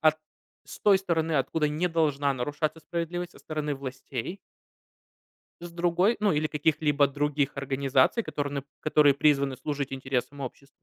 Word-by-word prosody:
от 155 Hz, -1 st, +4 dB, 0.5 s
с -, -, -10 dB
той 200 Hz, -2 st, +5 dB
стороны, 165 Hz, -4 st, 0 dB
откуда 150 Hz, +3 st, 0 dB
не 155 Hz, +5 st, 0 dB
должна 145 Hz, -4 st, +1 dB
нарушаться 150 Hz, +5 st, -2 dB
справедливость, 175 Hz, +2 st, -4 dB
со -, -, -16 dB
стороны 150 Hz, -2 st, -3 dB
властей. 135 Hz, -, -6 dB, 1.2 s
С 175 Hz, -, -7 dB
другой, 175 Hz, +5 st, +2 dB
ну, 210 Hz, -2 st, +3 dB
или 155 Hz, +1 st, +1 dB
каких-либо 150 Hz, -1 st, +2 dB
других 145 Hz, 0 st, 0 dB
организаций, 135 Hz, -, +2 dB
которые 145 Hz, -7 st, -3 dB
нып 140 Hz, -1 st, -3 dB, 0.2 s
которые 150 Hz, -2 st, +5 dB
призваны 140 Hz, -2 st, +2 dB
служить 140 Hz, -2 st, -3 dB
интересам 135 Hz, +1 st, -3 dB
обществ. 135 Hz, +1 st, -7 dB
150 Hz, 145 wpm, -27 LUFS, 140-165 Hz, 1.2 s, той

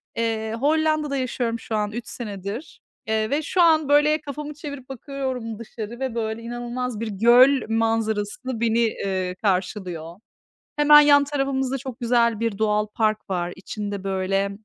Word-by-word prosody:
Eee, 225 Hz, -1 st, -1 dB
Hollanda'da 305 Hz, 0 st, +1 dB
yaşıyorum 240 Hz, -2 st, -2 dB
şu 225 Hz, -, -4 dB
an 210 Hz, -1 st, -1 dB
3 235 Hz, +1 st, -6 dB
senedir, 205 Hz, -, -7 dB, 0.3 s
eee, 220 Hz, 0 st, 0 dB
ve 285 Hz, +3 st, +1 dB
şu 355 Hz, +4 st, 0 dB
an, 315 Hz, -4 st, +4 dB
böyle, 300 Hz, +2 st, +4 dB
kafamı 295 Hz, +1 st, -6 dB
çevirip 285 Hz, -3 st, -8 dB
bakıyorum 260 Hz, -4 st, -5 dB
dışarı 230 Hz, +1 st, -7 dB
ve, 260 Hz, -3 st, -3 dB
böyle, 220 Hz, 0 st, -2 dB
inanılmaz 240 Hz, 0 st, -4 dB
bir 230 Hz, -, -3 dB
göl 240 Hz, +6 st, +5 dB
manzarası 225 Hz, -2 st, 0 dB, 0.2 s
beni, 230 Hz, 0 st, +2 dB
eee, 190 Hz, -5 st, -1 dB
karşılıyor. 185 Hz, -4 st, -2 dB, 0.6 s
Hemen 295 Hz, 0 st, +8 dB
yan 285 Hz, -1 st, +6 dB
tarafımızda 270 Hz, -2 st, -1 dB
çok 260 Hz, -2 st, -8 dB
güzel 235 Hz, -2 st, +2 dB
bir 230 Hz, -3 st, -1 dB
doğal 210 Hz, 0 st, +1 dB
park 215 Hz, 0 st, -1 dB
var. 180 Hz, -2 st, -2 dB
İçinde, 200 Hz, 0 st, -5 dB
böyle, 195 Hz, +1 st, 0 dB
230 Hz, 150 wpm, -23 LUFS, 210-270 Hz, 0.6 s, Hemen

